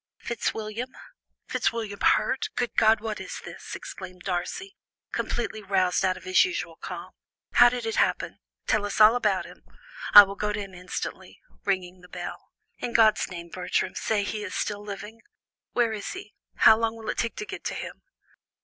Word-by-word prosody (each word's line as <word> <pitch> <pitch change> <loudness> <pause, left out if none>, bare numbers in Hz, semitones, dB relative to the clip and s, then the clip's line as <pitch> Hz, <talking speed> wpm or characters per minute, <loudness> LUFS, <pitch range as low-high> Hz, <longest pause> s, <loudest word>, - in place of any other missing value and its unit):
"Fitzwilliam? 225 +1 -3 0.6
Fitzwilliam 220 -3 -1
hurt! 260 - +2
Good 245 - -1
God, 220 0 +5
what 220 -1 -4
is - - -6
this?" - - -8
exclaimed 185 -1 -9
Darcy, 195 - -3 0.4
completely 220 -2 -2
roused 190 -3 +1
out 185 -1 +2
of - - -13
his 185 0 +5
usual 175 -2 -3
calm. 180 0 -7 0.4
"How 245 - +8
did 245 -1 -4
it 225 - -2
happen? - - +1 0.3
Tell 215 -2 +2
us 205 +1 -3
all 215 +2 +8
about 245 - +1
it. - - -13 0.6
I 205 - +15
will 195 0 -5
go 210 +1 -2
to 210 - -2
him 195 -2 -7
instantly" 180 0 -6 0.3
(ringing 185 -2 -1
the 180 - -16
bell). - - -7 0.3
"In 235 - -4
God's 220 -2 +4
name, 170 -2 -8
Bertram, 180 +1 -1
say 210 -2 0
he 210 +1 -3
is 200 - -5
still 205 -1 -2
living? 210 +2 -8 0.5
Where 235 -2 +2
is 205 -2 -5
he? 380 +2 -9 0.2
How 220 - +7
long 225 0 0
will 225 -1 -4
it - - -8
take 230 - -1
to 420 - -5
get 395 -1 -7
to - - -2
him?" - - -7
210 Hz, 180 wpm, -26 LUFS, 185-225 Hz, 0.6 s, I